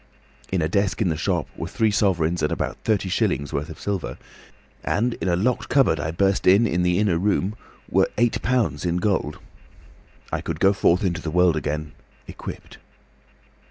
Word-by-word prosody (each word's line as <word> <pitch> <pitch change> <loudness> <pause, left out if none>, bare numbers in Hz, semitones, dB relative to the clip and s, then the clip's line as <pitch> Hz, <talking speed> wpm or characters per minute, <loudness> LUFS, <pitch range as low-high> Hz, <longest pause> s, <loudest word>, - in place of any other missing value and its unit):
In 95 -3 +1
a - - +1
desk 100 +3 0
in 100 - +2
the 80 - 0
shop 85 +1 -1
were 85 - -5
three 110 +3 +1
sovereigns 90 -5 +1
and 75 - 0
about - - -3
thirty 105 -4 +1
shillings' 70 -5 0
worth 75 +4 -2
of 80 - -9
silver, 100 -4 -3 0.7
and 120 +3 0
in - - -1
a 85 - +2
locked 115 +8 0
cupboard 135 - +3
I 75 - -2
burst 95 +4 +1
in 100 +5 +6 0.2
the 90 0 +2
inner 100 -5 +2
room 100 +1 0 0.3
were - - +2
eight 120 +1 +2
pounds 125 -3 0
in 85 -1 0
gold. 90 -6 0 0.9
I - - -1
could - - -4
go 95 +1 +4
forth 90 -1 +2
into 90 -2 -1
the 80 - -4
world 90 0 +3
again, 75 0 -3 0.4
equipped. - - -9
90 Hz, 180 wpm, -23 LUFS, 85-100 Hz, 0.9 s, in